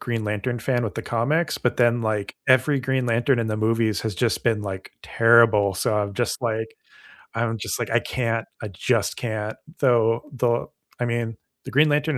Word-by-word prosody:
Green 115 -3 -3
Lantern 105 +4 -2
fan 120 +1 0
with 105 -5 -3
the - - -3
comics, 150 +9 0
but 125 - -1
then, 120 -1 +3
like, 105 -2 -2
every 130 +2 +4
Green 130 -1 0
Lantern 120 +2 +2
in 115 - 0
the 110 -1 -2
movies 110 -1 +1
has 110 -3 -3
just 120 +2 0
been, 115 -3 +1
like, 95 -2 -6
terrible, 115 -4 +4
so 105 - 0
I'm 100 -1 -1
just, 120 - -1
like 110 -1 -2 0.6
I'm 115 0 -1
just, 110 - -3
like, - - -2
"I - - +4
can't. 115 -2 -2 0.2
I 110 - -4
just 100 +3 0
can't." 110 -2 -4 0.2
Though 120 +1 +2
the 120 -2 +1 0.3
I 120 - +1
mean, 115 -2 -2 0.3
the - - -7
Green 150 +3 +4
Lantern 150 0 +1
115 Hz, 190 wpm, -23 LUFS, 110-125 Hz, 0.6 s, every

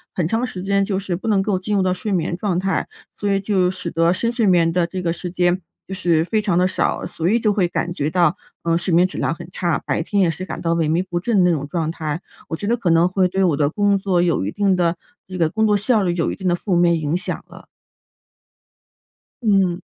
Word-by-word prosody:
很 175 - 0
长 225 +7 0
时 185 -5 -7
间 200 0 +2
就 195 -1 -1
是 190 -3 -3
不 225 - -7
能 205 -3 +3
够 195 -1 0
进 205 +3 -2
入 195 - +2
到 185 -1 +1
睡 200 +3 -4
眠 170 -1 0
状 190 -3 -1
态， 195 +1 -1 0.3
所 205 - -2
以 195 -1 +2
就 190 -3 +1
使 180 -2 -5
得 165 +1 +2
深 230 +5 -1
睡 235 -2 0
眠 170 -3 +4
的 170 0 +1
这 185 +1 -5
个 170 -2 0
时 175 +1 -5
间 180 +1 +1 0.3
就 190 - -6
是 170 -4 +1
非 215 +5 0
常 195 -5 0
的 180 - +4
少。 185 - -1
所 165 - -3
以 220 +5 +3
就 215 -2 +2
会 195 -4 +1
感 175 - -2
觉 150 -4 -2
到， 175 +2 +2 0.3
呃， 165 0 +2
睡 175 0 -1
眠 175 +2 +5
质 185 - -5
量 140 +4 0
很 165 - -10
差， 170 -5 0
白 - - 0
天 200 +4 0
也 170 - +2
是 185 +3 -6
感 - - -6
到 165 - 0
萎 165 -2 +1
靡 165 +3 +1
不 175 - -1
振 195 0 +2
的 180 - +4
那 165 - +2
种 145 -1 -4
状 160 -1 -1
态。 160 -1 -4 0.3
我 160 - -3
觉 205 - -6
得 235 - +2
可 205 -7 -1
能 165 +2 +4
会 185 0 +2
对 190 +1 0
我 165 -6 +2
的 145 -1 +2
工 205 +3 +2
作 190 -2 +1
有 170 - +1
一 100 - -2
定 200 - +1
的 170 -1 +1 0.3
这 185 0 -6
个 165 -2 +2
工 220 +4 +1
作 210 - +3
效 210 +2 +2
率 175 -2 +1
有 165 - 0
一 - - -4
定 190 - -3
的 175 - +3
负 185 +1 -1
面 170 -1 +3
影 155 +3 0
响 190 - -5
了。 - - -14 1.8
嗯。 195 -4 +2
180 Hz, 285 characters per minute, -20 LUFS, 170-195 Hz, 1.8 s, 眠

